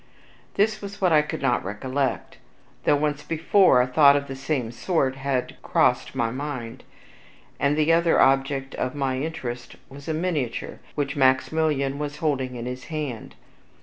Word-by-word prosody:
This 215 +2 +1
was 200 0 -8
what 180 -4 +3
I 155 - +6
could 150 -2 -5
not 125 -5 +1
recollect, 130 +8 -3 0.5
though - - +5
once 150 0 -1
before 165 -3 +4
a - - 0
thought 140 +2 +6
of 140 0 0
the 135 - -6
same 135 -4 -2
sort 130 +2 -1
had 135 -2 -2
crossed - - +1
my 115 -1 0
mind. 130 -3 -6 0.8
The 150 +3 +2
other 170 0 +3
object 135 0 +2
of 130 - -3
my 135 -2 -1
interest 125 -6 -5
was 140 +2 -12
a 160 - -1
miniature, 155 -8 -3 0.2
which 145 0 -2
Maximilian 140 +1 +1
was 150 0 -4
holding 135 -5 -1
in 120 -1 -6
his 125 0 -6
hand. 150 -8 -5
140 Hz, 155 wpm, -24 LUFS, 130-155 Hz, 0.8 s, I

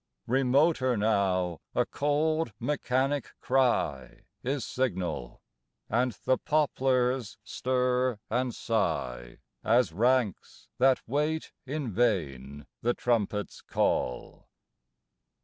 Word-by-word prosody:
Remoter 130 0 +3
now, 95 -5 +1
a - - +3
cold, 150 -2 0
mechanic 135 +1 0
cry 120 - 0 0.2
Is 135 +1 -2
signal, 95 - -3 0.5
and 120 +2 +2
the 130 - +3
poplars 130 -5 +1
stir 125 -1 0
and 125 +1 -1
sigh, 60 - -2 0.3
As 115 -6 +3
ranks 120 0 0
that 130 0 +4
wait 150 +5 -1 0.2
in 140 -3 -3
vain 75 - -1 0.2
the 120 +1 +1
trumpet 105 -4 0
s - - -14
call. 60 - -1
125 Hz, 95 wpm, -29 LUFS, 100-130 Hz, 0.5 s, that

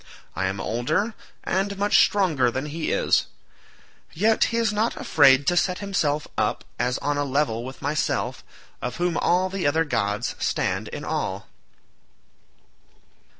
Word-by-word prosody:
I 95 +1 0
am 95 +1 -3
older 155 - -1 0.3
and 195 +2 -1
much 205 +1 +4
stronger 160 -11 +3
than 130 +4 -3
he 155 +2 -3
is; - - +2 0.9
yet 215 +6 +3
he 230 - -2
is 225 -2 +1
not 215 +3 0
afraid 135 -2 +5
to 175 - +2
set 180 +1 +1
himself 155 -7 -1
up - - 0 0.2
as 125 +1 0
on 145 +1 -1
a - - +1
level 135 -5 0
with 130 +2 -9
myself, 150 +2 -1 0.4
of 125 0 -4
whom 175 -1 0
all 180 +3 +2
the 190 -4 -2
other 160 +3 +2
gods 105 -4 -1
stand - - -1
in - - -7
awe." - - -2
150 Hz, 150 wpm, -24 LUFS, 130-190 Hz, 0.9 s, afraid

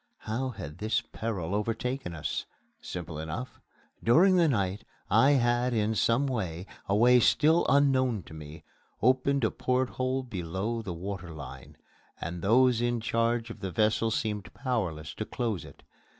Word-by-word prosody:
How 125 +5 -2
had 85 - -8
this 110 +1 +1
peril 100 -6 -4
overtaken 115 0 -2
us? 80 - -3 0.3
Simply 85 -3 -6
enough: 95 +12 -6 0.4
During 180 +11 +5
the 170 -2 +5
night 100 -7 0 0.3
I 130 +7 +6
had 120 -1 +2
in 110 0 +1
some 115 +5 +2
way 95 -10 -3 0.2
a 100 - +3
way 125 +3 +6
still 155 +7 +4
unknown 130 -7 +3
to 80 - -13
me 75 0 -10 0.4
opened 130 +2 +3
a 110 - +2
porthole 130 +1 -1
below 100 +1 -3
the 100 - -5
water 95 0 -5
line; 70 -4 -10 0.4
and 85 +1 -5
those 120 +4 +4
in 120 0 +1
charge 115 +1 0
of 115 - -10
the 95 -2 -4
vessel 110 +3 +2
seemed 105 -3 -2
powerless 95 - -2
to - - -4
close 110 -4 -3
it. - - -14
115 Hz, 150 wpm, -29 LUFS, 95-125 Hz, 0.4 s, I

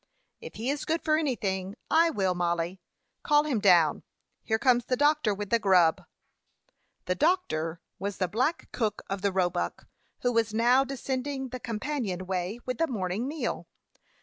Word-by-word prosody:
"If - - -10
he 235 +5 -1
is 285 - -3
good 325 +1 -1
for 310 -1 +3
anything, 200 - -1 0.2
I 330 +1 +5
will, 190 - 0
Mollie. 175 +1 -1 0.4
Call 295 -1 +4
him 285 -7 0
down. 175 -7 +4 0.4
Here 220 - +1
comes 245 0 +3
the 255 - +1
doctor 290 -4 +3
with 205 0 -4
the 235 - +4
grub." 180 -6 +4 1.0
The 180 - +1
"doctor" 170 - 0 0.2
was 200 0 -3
the 185 - 0
black 255 - -1
cook 215 -4 -2
of 195 -1 -2
the 200 0 +1
Roebuck, 180 -2 -1 0.3
who 245 - +1
was 225 -2 +1
now 245 +4 +4
descending 265 0 -3
the 255 +1 -6
companion 230 -6 -3
way 185 +4 -3
with 250 -2 -3
the 330 - +2
morning 205 - -2
meal. 305 +2 -3
220 Hz, 165 wpm, -28 LUFS, 185-270 Hz, 1.0 s, I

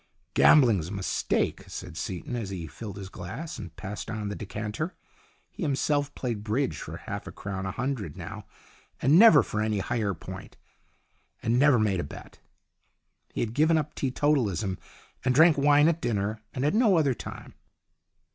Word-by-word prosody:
" - - -44
Gambling's 115 - +6
a - - -7
mistake," 100 -2 -1
said - - -8
Seaton, 95 +6 -4
as 115 -5 -3
he 90 -4 -5
filled 100 +6 -8
his 100 -1 -7
glass 115 - -7
and 90 -6 -9
passed 105 +3 -6
on 110 -2 -3
the 100 - -4
decanter. 105 - -4 0.6
He - - -11
himself 145 -1 0
played 115 -5 -3
bridge 105 - -1
for - - -7
half - - -6
a - - -6
crown 95 -1 -5
a - - -2
hundred 120 - -3
now, - - -8 0.5
and 145 +7 +5
never 215 -10 +8
for 105 - -3
any 110 -1 0
higher 105 -1 -1
point, - - -10 0.9
and 115 +2 +2
never 145 -2 +6
made 105 -4 +1
a - - -1
bet. 70 - -11 0.9
He - - -3
had 115 -1 -2
given 155 +4 +4
up 150 -1 -2
teetotalism 125 - 0 0.4
and 130 0 +2
drank 160 +2 +7
wine 145 +1 +5
at 165 0 +1
dinner 105 -1 -1
and 130 +1 -2
at 150 - +2
no 215 -5 +4
other 145 -5 +3
time. - - -9
115 Hz, 175 wpm, -27 LUFS, 100-145 Hz, 0.9 s, never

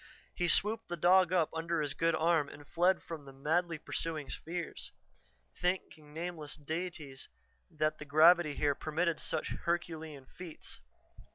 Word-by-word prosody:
He 175 - 0
swooped 215 +5 +2
the 175 - -3
dog 180 +1 +5
up 175 -4 +2
under 165 +1 -1
his 145 -2 -1
good 165 +3 +2
arm 160 -3 +2
and 145 - -12
fled 180 +4 +2
from 160 -4 -7
the 135 - -10
madly 160 +5 0
pursuing 155 -1 -3
spheres, 170 0 -5 0.6
thanking 175 -4 -2
nameless 160 -2 -5
deities 155 -3 -5 0.4
that 155 -2 -1
the 150 - -7
gravity 155 +1 +6
here 145 -1 +2
permitted 160 +3 -1
such - - -1
herculean 160 -4 -3
feats. 170 +2 -9
165 Hz, 145 wpm, -33 LUFS, 150-175 Hz, 0.6 s, gravity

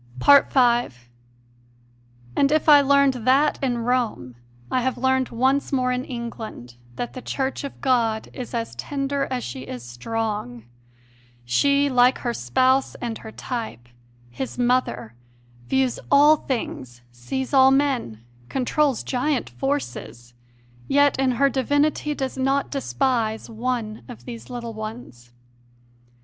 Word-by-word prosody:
5. 240 - +4 1.3
And 280 0 +3
if 310 +1 +1
I 295 -2 +8
learned 280 -1 +4
that 275 +5 +3
in 250 -3 0
Rome, 235 - -1 0.4
I 255 - +1
have 260 +1 -1
learned 260 0 +1
once 265 +4 +1
more 255 -2 +1
in 250 +1 -2
England 230 - -7 0.2
that 240 - -4
the 255 - -7
Church 270 +2 -3
of 280 - -7
God 230 -4 +1
is 250 -1 -6
as 230 -1 -3
tender 280 0 -2
as 255 -2 -3
she 125 +2 -6
is 125 -2 -7
strong. 125 - -4 0.8
She, 280 - +3
like 250 -1 +4
her 240 -2 -3
Spouse 255 - +1
and 235 -2 -5
her 220 - -10
type, 220 - -6 0.4
His 260 - -5
Mother, 245 - 0 0.5
views 265 -2 +1
all 290 +2 +7
things, 130 - -5
sees 250 - -5
all 265 -1 +7
men, 265 - 0 0.2
controls 270 0 0
giant 260 - -1
forces; 120 -2 -4 0.5
yet 285 -1 +3
in 265 -1 +2
her 275 +3 +3
divinity 290 +3 0
does 265 -1 -4
not 270 +1 0
despise 250 -6 -1
"one 225 -2 -3
of 245 - -11
these 235 -2 -9
little 235 -2 -6
ones." 215 - -8
250 Hz, 130 wpm, -23 LUFS, 220-270 Hz, 1.3 s, I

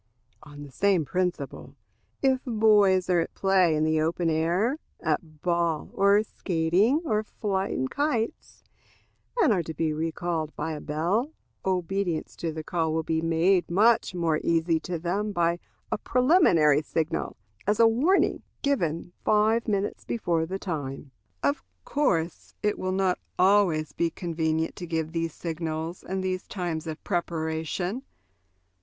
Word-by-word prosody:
On 145 -1 -11
the 145 - -11
same 190 -1 +2
principle, 180 +5 -3 0.5
if 265 -1 +3
boys 210 -5 +4
are 180 -2 +3
at 165 - -3
play 190 -4 +3
in 155 - +1
the 155 0 +2
open 165 +1 0
air 175 - +1 0.2
at 155 -1 -3
ball, 170 -3 0
or 200 +2 +4
skating, 190 - +1
or 215 -7 +1
flying 195 - -2
kites 260 - -2 0.8
and 325 - +5
are 185 - +1
to 160 -1 -7
be 155 0 0
recalled 160 0 -2
by 160 - -3
a 150 - -5
bell, 185 - -1 0.3
obedience 185 -2 -1
to 165 - -2
the 155 0 -6
call 165 -1 -1
will 160 +1 0
be 160 0 0
made 170 +3 +2
much 215 +2 +3
more 165 -3 +1
easy 165 0 +2
to 175 +2 -4
them 195 +6 -2
by 170 -2 +1 0.3
a - - 0
preliminary 240 - +4
signal, 160 -2 -2 0.3
as 210 0 +2
a 230 - +7
warning, 280 +13 +2 0.2
given 175 - -1
five 220 +2 +3
minutes 200 -1 -1
before 170 -8 -1
the 190 +3 -3
time. 145 -7 -5 0.3
Of 140 +1 +1 0.2
course, 175 - -1
it 210 0 0
will 185 - -1
not 190 -1 +1 0.2
always 185 -5 +3
be 170 - 0
convenient 160 -2 -2
to 175 - -6
give 160 -1 -2
these 165 -1 -2
signals 165 0 -4
and 190 +1 -3
these 185 -1 -2
times 170 -4 -3
of 155 -1 -6
preparation. 170 - -2
175 Hz, 145 wpm, -27 LUFS, 160-200 Hz, 0.8 s, a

